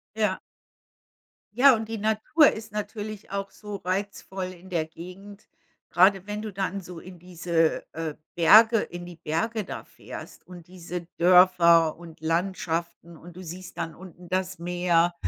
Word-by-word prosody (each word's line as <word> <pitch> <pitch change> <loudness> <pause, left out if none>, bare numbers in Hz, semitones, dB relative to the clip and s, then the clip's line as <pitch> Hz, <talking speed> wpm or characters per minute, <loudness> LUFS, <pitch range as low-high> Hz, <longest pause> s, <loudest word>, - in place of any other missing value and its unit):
Ja. 210 -4 0 1.1
Ja, 260 +2 +7
und 220 0 -4
die 225 - -3
Natur 220 +9 +3
ist 215 -1 -8
natürlich 210 -1 -6
auch 195 0 -3
so 210 -1 -7
reizvoll 190 0 -4
in 180 +2 -15
der 165 -4 0
Gegend. 185 +5 -12 0.4
Gerade 190 +2 +4
wenn 210 0 -4
du 215 -1 -5
dann 195 0 -3
so 175 -1 -9
in 180 +1 -12
diese, 170 -2 0
äh, 160 -2 -4 0.2
Berge, 220 +6 +7
in 175 0 -7
die 175 -1 -10
Berge 170 +8 -2
da - - -7
fährst - - -11
und 175 -2 -12
diese 175 -1 -7
Dörfer 170 -2 +6
und 165 -2 -13
Landschaften 170 0 -2
und 170 +2 -13
du - - -8
siehst 180 +2 -9
dann 165 - -4
unten 180 -1 -13
das 185 0 -2
Meer 175 0 +2
180 Hz, 155 wpm, -26 LUFS, 170-200 Hz, 1.1 s, Ja